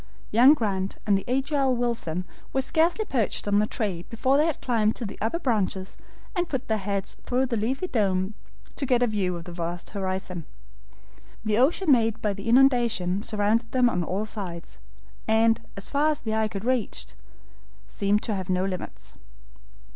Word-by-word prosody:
Young 250 +7 +7
Grant 195 -6 -2
and 205 - +4
the 195 - -3
agile 270 0 +1
Wilson 230 -8 -2 0.3
were 265 - +1
scarcely 335 +9 +2
perched 230 - -1
on 205 0 +3
the 210 - +2
tree 200 -8 -2
before 260 +4 +1
they 300 +3 +4
had 320 - -2
climbed 220 -3 +1
to 240 - -4
the 200 - -7
upper 225 +10 0
branches 200 - -1 0.4
and 350 -1 0
put 265 -2 -3
their 220 -1 0
heads 200 0 -3
through 255 +1 +1
the 245 -2 -2
leafy 245 - -1
dome 195 - 0 0.4
to 275 - -1
get 245 -1 +3
a - - +5
view 200 -5 -1
of 170 - -6
the 175 - -9
vast 170 0 -5
horizon. 185 -4 -4 1.0
The 215 +1 +2
ocean 300 +5 +3
made 225 -3 +3
by 210 -3 0
the 200 +3 -5
inundation 235 -7 +3
surrounded 220 +2 0
them 250 -2 +4
on 180 - 0
all 190 +5 -2
sides, 175 - -7 0.5
and, 225 +1 +3 0.2
far 285 +9 0
as 300 - -1
the 220 -1 -3
eye 220 0 +2
could 200 0 -6
reach, 240 - -1 0.8
seemed 200 - 0
to 220 - -1
have 190 -1 -4
no 185 0 +1
limits. 65 - -6
220 Hz, 175 wpm, -26 LUFS, 190-250 Hz, 1.0 s, Young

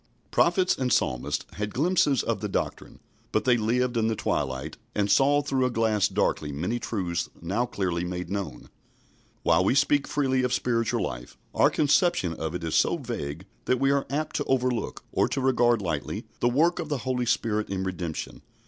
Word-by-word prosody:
Prophets 180 +1 +3
and 125 -1 -1
Psalmists 70 - 0
had 105 +1 -3
glimpses 150 -2 +2
of - - -2
the - - -2
doctrine, - - -3 0.3
but - - 0
they 125 -2 +5
lived 120 +2 0
in 110 -1 +2
the 110 - 0
twilight, 70 -4 -2 0.2
and 100 -1 +1
saw 140 +6 +4
through 135 -2 0
a 125 - +2
glass 110 -4 +2
darkly 75 - 0
many 90 +12 -2
truths 90 -7 -2
now 100 +9 -1
clearly 90 -5 -2
made 90 0 -4
known. 95 -11 -5 0.7
While - - +4
we - - +2
speak 145 0 +3
freely 130 -3 +1
of 125 -1 0
spiritual 115 -3 0
life, - - -6 0.2
our - - +5
conception 150 - +2
of 80 +1 -4
it 90 - -4
is 80 -1 -3
so - - +3
vague 75 +6 -5 0.2
that 125 - +1
we 135 0 +3
are 140 -1 +1
apt 150 +3 -2
to 145 - 0
overlook, 125 -4 -1
or - - +2
to - - -2
regard 120 -4 +3
lightly, 80 -5 -3
the 120 - +3
work 165 +8 +2
of 160 -3 -4
the 145 - 0
Holy 125 -2 -1
Spirit 110 -2 0
in 95 -1 -2
redemption. 90 -4 -4
115 Hz, 185 wpm, -26 LUFS, 90-135 Hz, 0.7 s, they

